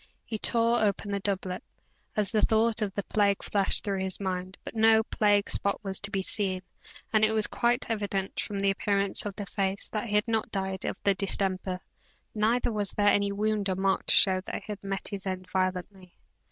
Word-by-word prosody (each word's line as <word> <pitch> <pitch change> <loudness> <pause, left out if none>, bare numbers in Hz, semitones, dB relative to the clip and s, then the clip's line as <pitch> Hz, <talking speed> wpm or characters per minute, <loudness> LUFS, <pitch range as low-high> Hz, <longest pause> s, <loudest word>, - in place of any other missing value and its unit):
He 220 -2 -4
tore 230 +1 +2
open 205 0 0
his 200 - -2
doublet, 190 -2 -2 0.5
as 210 -2 0
the 215 -2 +2
thought 225 +1 +2
of 205 -2 -1
the 200 - -2
plague 200 -1 +1
flashed 200 -2 +2
through 200 -2 -2
his 190 -1 -2
mind, 185 -1 -4
but - - -7
no 220 0 +5
plague 205 -2 +2
spot 200 - 0
was 190 -1 -2
to 200 - 0
be 195 -2 -1
seen, 190 -3 -1 0.5
and 215 0 +4
it 215 0 +4
was 215 -1 +3
quite 240 +1 0
evident, 200 -3 -2
from 205 - -3
the 195 0 +2
appearance 200 0 +1
of 200 - -6
the 205 - -5
face, 195 +1 -2
that 215 +2 -3
he 210 - -1
had 210 +2 +2
not 225 -1 0
died 190 -1 -3
of - - -3
the 200 - +4
distemper, 190 -1 -1 0.5
neither 230 +3 +1
was 205 -3 +2
there 205 0 +3
any 200 0 +2
wound 210 0 0
or 185 - 0
mark 190 0 0
to - - +5
show 185 -1 +5
that - - -6
he 215 - -7
had 205 -1 -7
met 195 -2 -3
his 200 -1 -5
end 185 -1 -4
violently. 185 0 -3
200 Hz, 210 wpm, -28 LUFS, 190-215 Hz, 0.5 s, no